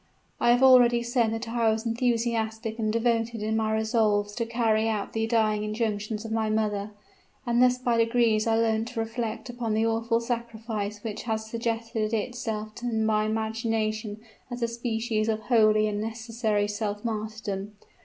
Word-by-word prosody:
I - - +3
have 245 +2 +4
already 245 -2 +6
said 235 -2 +1
that 225 +1 -4
I 230 -1 +1
was 220 +1 -1
enthusiastic 230 -1 -1
and 215 -1 0
devoted 230 -1 0
in 220 +1 0
my 220 -1 +1
resolves 220 -2 +1
to 230 +1 -2
carry 225 -1 +1
out 210 -2 -2
the 225 0 0
dying 215 -2 +2
injunctions 215 0 -2
of 225 - -6
my 220 -1 0
mother: 210 -1 0 0.6
and 240 0 +2
thus 250 0 +5
by 245 -2 0
degrees 230 -1 +2
I 225 - +3
learnt 225 0 +1
to 240 -1 -5
reflect 225 +1 -3
upon 240 -3 -2
the 220 +1 +2
awful 230 +1 +1
sacrifice 225 -3 -4
which 220 -3 -4
had 225 -2 -1
suggested 225 0 -2
itself 220 -1 -3
to 245 - -4
my 220 -1 +1
imagination 220 -1 -2 0.3
as 245 -1 -4
a - - +2
species 230 -2 -1
of 220 0 0
holy 215 -2 +4
and 205 0 -2
necessary 225 -2 -1
self 205 +1 -3
martyrdom. 215 -2 -4
225 Hz, 165 wpm, -27 LUFS, 215-235 Hz, 0.6 s, already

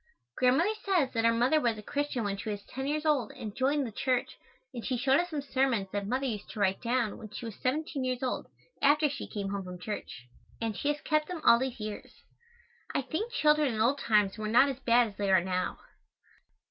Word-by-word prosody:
Grandmother 270 +11 +3
says 355 -9 +2
that 225 -1 +1
our 230 - +6
mother 245 +7 +3
was 235 -4 +1
a 210 - -9
Christian 285 -1 -2
when 200 -1 -1
she 200 - -6
was 205 -1 -4
ten 265 +1 -5
years 305 +2 -1
old 285 -8 +2
and 210 -1 -7
joined 275 +2 +1
the 230 - -5
church 255 +3 -1 0.4
and 235 - -6
she 255 - -1
showed 270 +2 +3
us 355 0 -1
some 300 -4 -3
sermons 260 -8 0
that 200 -1 -3
mother 255 +5 0
used 215 -6 -4
to - - -8
write 190 -1 +1
down 235 -3 0
when 215 - -9
she 215 - -7
was 225 - -5
seventeen 285 +1 -1
years 255 0 -2
old, 255 - -2 0.3
after 300 +2 +5
she 280 -1 -5
came 200 -2 -4
home 200 -1 -3
from 180 -1 -8
church, 180 - -6 0.3
and 225 -2 -2
she 285 - -3
has 295 0 +1
kept 305 -1 +1
them 360 -2 -5
all 235 - +7
these 260 -1 -3
years. 215 -1 -6 0.8
I - - +1
think 340 - -3
children 300 - +3
in - - -3
old 250 +6 +2
times 210 -3 +2
were 215 - -2
not 240 +6 +5
as 265 -1 -4
bad 240 -2 +4
as 200 - -16
they 200 -1 -1
are 190 - +7
now. 185 -1 -2
250 Hz, 230 wpm, -30 LUFS, 215-285 Hz, 0.8 s, all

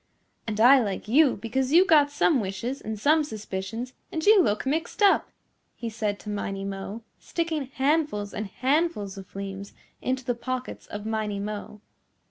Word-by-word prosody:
"And 215 -1 -3
I 260 +4 +8
like 200 -2 -3
you 275 +4 +5
because 255 +5 -1
you 355 +3 +7
got 300 -6 +5
some 290 0 +2
wishes 215 +7 -3
and 215 -1 -5
some 305 +6 +4
suspicions 220 0 -5 0.2
and 315 -1 -3
you 420 -2 +7
look 210 -8 0
mixed 320 +9 -1
up," 400 - +4 0.5
he 230 -1 -5
said 215 -2 -2
to 210 - -8
Miney 195 -1 -3
Mo, 195 +3 -6 0.2
sticking 320 -5 -2
handfuls 270 -6 0
and 215 - -3
handfuls 255 - 0
of 190 - -12
fleems 195 0 -6 0.3
into 260 0 -2
the 245 - +1
pockets 255 +2 -5
of 205 0 -7
Miney 215 -2 -2
Mo. 210 0 -6
230 Hz, 165 wpm, -26 LUFS, 205-285 Hz, 0.5 s, I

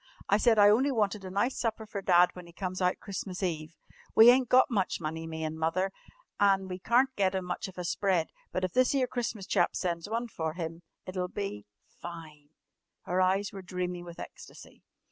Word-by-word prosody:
I 200 - +4
said 225 0 +4
I 205 0 +8
only 255 +7 +3
wanted 210 -4 0
a 185 - -6
nice 205 +8 0
supper 225 -2 -2
for 205 -2 -5
Dad 180 -2 +5
when 180 -1 -10
he 170 - -15
comes 185 0 -4
out 180 0 +1
Christmas 195 -1 -5
Eve. 160 -2 -3 0.4
We 225 +2 +10
ain't 255 -1 +2
got 255 +2 +5
much 195 -5 0
money, 160 0 -4
me 160 0 -5
an' 155 0 -4
Mother, 185 +4 0 0.5
an' 195 -1 +3
we 180 0 -5
carn't 250 +6 +2
get 190 -1 +1
'im 190 -1 -2
much 180 - -3
of 190 - -12
a 180 - -3
spread, 180 -2 +1 0.2
but 185 - -2
if 185 - -1
this 255 +2 +3
'ere 265 -2 +3
Christmas 235 -5 -4
chap 185 -3 +1
sends 170 +1 -2
one 230 +2 -2
fer 160 -7 -3
'im, 165 -1 -5 0.2
it'll 185 -1 -3
be 185 - -5 0.2
fine!" 155 -4 -11 0.5
Her 180 +1 0
eyes 190 +2 +1
were 195 - -7
dreamy 180 -1 -4
with 170 -1 -10
ecstasy. - - -11
185 Hz, 205 wpm, -29 LUFS, 175-210 Hz, 0.5 s, We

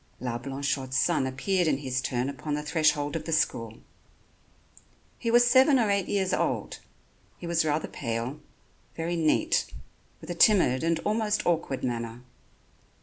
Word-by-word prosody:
La 120 -1 -3
Blanchotte's 135 0 -3
son 155 -6 +2
appeared 175 +7 0
in 145 -3 +2
his 130 -2 -2
turn 125 -1 -2
upon 140 +2 -4
the 150 - -4
threshold 150 -1 +1
of 165 - -4
the 165 - -4
school. 115 -7 0 1.4
He 230 - -2
was 240 +1 +5
seven 260 +3 +5
or 220 -5 +2
eight 200 -2 0
years 195 -2 0
old. - - -1 0.6
He - - -9
was 170 -1 +1
rather 155 0 -1
pale, 120 +3 -4 0.6
very 165 +1 -2
neat, 170 - +1 0.5
with - - -8
a - - -1
timid 175 - +4
and 165 0 +1
almost 215 0 0
awkward 165 -6 -1
manner. 115 -1 -4
155 Hz, 150 wpm, -27 LUFS, 130-185 Hz, 1.4 s, was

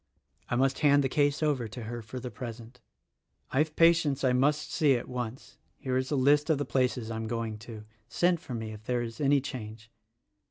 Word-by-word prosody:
I - - 0
must 135 +2 +2
hand 145 -2 +5
the - - +2
case 145 +2 +1
over 140 -6 +1
to 110 +3 -8
her 120 +2 -5
for 110 +4 -7
the 125 0 -6
present. 120 -1 -9 0.7
I 135 - +1
have 155 0 +1
patients 165 -5 +4
I 130 -1 +3
must 145 +4 +1
see 145 -4 +4
at 120 - -4
once 125 0 -6 0.2
(here 130 -3 -3
is 130 0 0
a 150 - 0
list 145 +3 +3
of 160 - +3
places 125 -3 0
I 110 - -3
am 110 0 -4
going 115 -2 -3
to 110 -1 -9 0.2
— 110 - -41
send 175 -1 +4
for 130 -6 -7
me 110 -1 -5
if 105 0 -11
there 120 0 0
is 115 +5 -7
any 140 -1 +4
change). 115 -4 -8
125 Hz, 215 wpm, -29 LUFS, 115-145 Hz, 0.7 s, hand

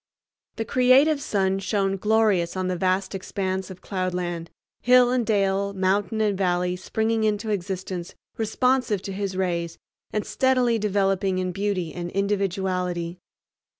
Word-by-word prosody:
The 225 - -3
creative 270 +5 +4
sun 195 -4 0
shone 195 0 0
glorious 205 -4 +2
on 185 0 -1
the 185 - 0
vast 185 +2 0
expanse 190 0 -3
of 185 -1 -10
cloudland; 180 -3 -3 0.3
hill 250 0 +5
and 250 -1 +2
dale, 200 -2 +1
mountain 195 +2 0
and 210 -2 +2
valley 180 -1 0
springing 220 +4 -1
into 215 0 0
existence 185 -2 -4 0.2
responsive 225 -2 +1
to 195 - -5
his 195 -1 -3
rays 170 -3 -1 0.3
and 210 - -2
steadily 250 -3 +2
developing 195 -2 +1
in 185 0 -1
beauty 190 -3 -2
and 175 -1 -5
individuality. 185 -3 -1
195 Hz, 135 wpm, -24 LUFS, 185-215 Hz, 0.3 s, hill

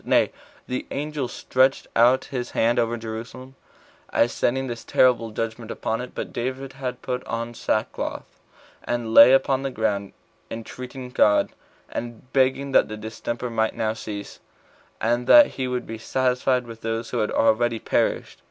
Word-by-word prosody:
Nay, - - +3 0.4
the 125 0 -3
angel 145 -2 -3
stretched 130 +2 +1
out 120 +3 +5
his 125 -1 -3
hand 115 +2 +3
over 120 0 0
Jerusalem, 115 +4 -7 0.6
as 120 - +3
sending 130 +2 0
this 120 -3 -6
terrible 125 -3 +3
judgment 115 +1 -4
upon 115 +1 -2
it. 125 - -9
But - - -5
David 130 +2 -4
had 130 -2 -5
put 125 0 -3
on 115 +1 -3
sackcloth, 110 -2 -2 0.6
and 120 -2 -2
lay 115 +2 +10
upon 135 0 +3
the 135 - -2
ground, 105 -5 -2 0.4
entreating 125 +3 -7
God, 105 -4 +3 0.4
and 120 +2 -7
begging 135 +1 +2
that - - +5
the 110 - -6
distemper 115 +3 -5
might 110 -1 0
now 110 -1 0
cease, 105 -2 -7 0.6
and 120 +2 0
that 295 -1 +9
he 130 - -4
would 125 -1 -2
be 115 0 -7
satisfied 125 +1 +1
with 115 -1 -10
those 115 +1 -3
that - - -1
had 105 - 0
already 115 +1 +2
perished. - - -1
120 Hz, 160 wpm, -24 LUFS, 115-130 Hz, 0.6 s, lay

